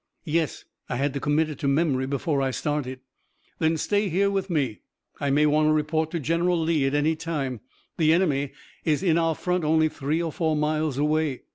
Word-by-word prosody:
"Yes, 160 -1 -1 0.2
I 125 - -1
had 135 +2 0
to 140 - -2
commit 150 +3 +1
it 150 - -8
to 140 - -1
memory 140 -2 +1
before 140 +1 -1
I 135 - +1
started." 130 -1 -3 0.6
"Then 160 0 +2
stay 205 +4 0
here 200 +4 +2
with 195 -1 -2
me. 135 - -1 0.4
I 140 - -1
may 145 +2 +4
want 150 +1 +3
to 155 - +4
report 155 +1 0
to 170 - -3
General 170 +4 +1
Lee 160 -4 +1
at 135 - 0
any 150 +2 +2
time. 140 -8 -3 0.4
The 155 -2 +4
enemy 145 -6 +2 0.3
is 155 +2 +1
in 170 -3 +3
our 165 -1 +1
front 180 0 -1
only 155 +1 +3
three 150 +1 -2
or 170 -2 -2
four 160 0 0
miles 150 -2 0
away. 150 -2 0
155 Hz, 205 wpm, -25 LUFS, 140-165 Hz, 0.6 s, may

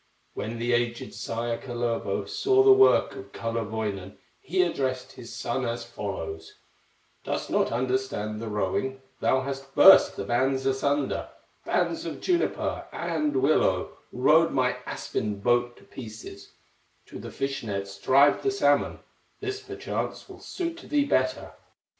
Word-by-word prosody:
When 115 +2 -4
the 120 +1 0
aged 120 0 -1
sire, 115 0 -3
Kalervo, 120 -5 -2
Saw 400 - +3
the 400 - +7
work 400 +1 +5
of 395 - -10
Kullerwoinen, 110 -4 -3 0.2
He 180 +4 +1
addressed 130 -7 -2
his 120 -3 -11
son 125 +2 -2
as 120 -1 -2
follows: 95 -8 -6 0.7
"Dost - - -3
not - - +2
understand 120 -3 -2
the 115 - -5
rowing; 110 +6 -2 0.2
Thou 130 - +2
hast 135 0 -6
burst 195 - +8
the - - -4
bands 130 +5 0
asunder, 140 +1 0 0.4
Bands - - 0
of - - -5
juniper 355 -2 -1
and 160 -4 -1
willow, 155 +3 +2 0.2
Rowed - - +4
my - - +1
aspen 105 -1 -3
boat 120 +3 +1
to - - -18
pieces; 110 -4 -10 0.6
To - - -10
the - - -7
fish 135 0 -3
nets 100 -2 -5
drive 140 +6 +4
the 405 - +1
salmon, 400 0 +1 0.4
This, 405 0 -4
perchance, 400 -1 -5
will - - -12
suit 340 -2 -4
thee 295 -4 0
better." 130 - 0
130 Hz, 140 wpm, -27 LUFS, 115-145 Hz, 0.7 s, burst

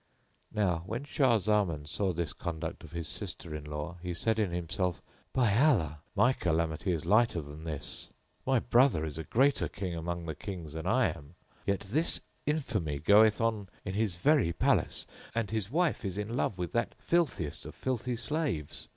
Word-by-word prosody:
Now, 90 -6 +1
when 115 +7 -3
Shah 135 -5 +3
Zaman 95 -7 +1
saw 95 +5 0
this 85 -2 -2
conduct 80 -2 -5
of - - -11
his 85 -2 -2
sister 80 - -1
in 75 -1 -5
law 75 +3 -5
he 90 -1 -3
said 110 +5 +1
in 105 -4 +2
himself, 85 +1 -1 0.3
"By 120 -6 +3
Allah, 105 - +3 0.2
my 125 +2 +5
calamity 85 -2 0
is 80 -3 -2
lighter 110 -4 +4
than 75 +1 -8
this! 75 -4 -3 0.3
My 130 0 +3
brother 120 - +4
is 75 0 -5
a - - -3
greater 135 - +3
King 95 -3 -4
among 85 +1 -3
the 80 - -3
kings 85 -2 -7
than 80 0 -4
I - - +4
am, 70 +4 -14 0.3
yet 100 -1 +1
this 140 - +1 0.3
infamy 110 - 0
goeth 105 +7 +6
on 110 -4 0 0.2
in 95 - -3
his 105 -3 0
very 140 - +3
palace, - - +2 0.3
and 115 -3 -1
his 110 -3 -1
wife 165 +1 +1
is 95 -2 -3
in 105 +2 -3
love 110 -5 0
with 90 -2 -3
that 115 -1 0
filthiest 165 - 0
of - - -9
filthy 125 -1 -2
slaves. 125 - -2
95 Hz, 180 wpm, -31 LUFS, 80-115 Hz, 0.3 s, goeth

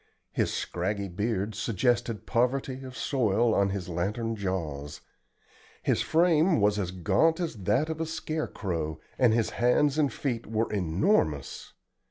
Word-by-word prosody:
His - - 0
scraggy 100 +3 -2
beard 105 +2 -2
suggested 115 +2 0
poverty 130 +2 0
of 130 -2 -9
soil 115 -2 +2
on 100 -1 +3
his 95 -2 -4
lantern 105 +7 -2
jaws. 80 -8 -4 0.8
His - - +2
frame 165 -1 +3
was 105 0 +3
as 95 -3 -1
gaunt 155 - +2
as 170 -3 -2
that 105 +10 +2
of 160 0 -4
a 160 - -1
scare 160 -1 -3
crow, 80 -5 -3 0.2
and 125 -3 +5
his 115 0 +1
hands 135 +5 +2
and 145 -3 +2
feet 120 -5 -3
were 110 +1 -1
enormous. 90 - 0
115 Hz, 145 wpm, -28 LUFS, 95-135 Hz, 0.8 s, and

